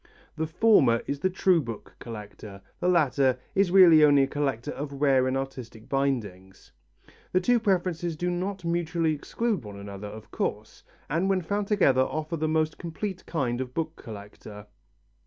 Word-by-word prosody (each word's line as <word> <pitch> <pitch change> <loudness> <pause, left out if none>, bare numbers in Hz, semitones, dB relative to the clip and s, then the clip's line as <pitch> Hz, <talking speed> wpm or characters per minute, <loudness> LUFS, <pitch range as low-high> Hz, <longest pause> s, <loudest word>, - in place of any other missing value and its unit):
The 160 0 -2
former 155 - +4
is 140 - -3
the 185 - +1
true 185 -2 +3
book 115 -5 -8
collector, 105 -3 -9 0.2
the - - -1
latter 140 -7 +3 0.2
is 195 -1 +2
really 175 -4 +7
only 145 -2 +6
a - - +1
collector 135 -5 -2
of 140 0 -6
rare 135 -3 +3
and 130 +1 0
artistic 130 -4 -7
bindings. 105 -9 -3 0.6
The 185 - +4
two 240 +6 +3
preferences 180 -5 0
do 175 +3 -2
not 185 +1 -3
mutually 170 -1 0
exclude 205 - -2
one 100 -2 -9
another, 100 0 -8
of 110 +1 -11
course, - - -4 0.3
and 170 +6 0
when 190 -2 +1
found 200 +3 -2
together 160 -12 +3
offer 155 +4 -2
the 155 0 -1
most 155 0 0
complete 185 +3 -5
kind 130 -6 -1
of 125 -1 -6
book 160 0 -2
collector. 105 -2 -11
150 Hz, 165 wpm, -27 LUFS, 125-175 Hz, 0.6 s, really